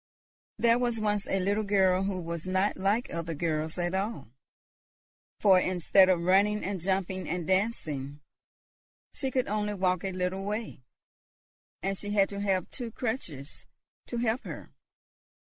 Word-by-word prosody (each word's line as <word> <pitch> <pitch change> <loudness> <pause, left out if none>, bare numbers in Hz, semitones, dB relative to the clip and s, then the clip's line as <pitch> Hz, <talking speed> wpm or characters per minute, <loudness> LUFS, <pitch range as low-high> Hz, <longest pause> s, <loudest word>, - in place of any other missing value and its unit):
There 235 0 +4
was 240 -2 0
once 210 -2 0
a 195 - +1
little 200 +3 +1
girl 190 -2 +3
who 195 -2 -2
was 170 0 -5
not 190 +2 +1
like 200 +6 0
other 165 -1 -3
girls 160 0 -1
at 175 0 -1
all; 190 - -2 1.1
for 190 -3 +6
instead 185 +1 +4
of 180 -2 +3
running 200 +4 +3
and 195 -1 -2
jumping 190 0 -1
and 175 0 -2
dancing, 155 -8 -1 0.9
she 265 - -2
could 255 -1 0
only 210 0 -1
walk 185 -1 +1
a 195 - -2
little 185 +1 -2
way, 210 - -4 1.0
and 195 +1 0
she 205 +2 -7
had 200 -2 +4
to 200 - -5
have 195 -3 0
two 245 -3 -5
crutches 210 - -5 0.4
to 240 - -4
help 235 +1 0
her. - - -8
190 Hz, 150 wpm, -29 LUFS, 180-210 Hz, 1.1 s, for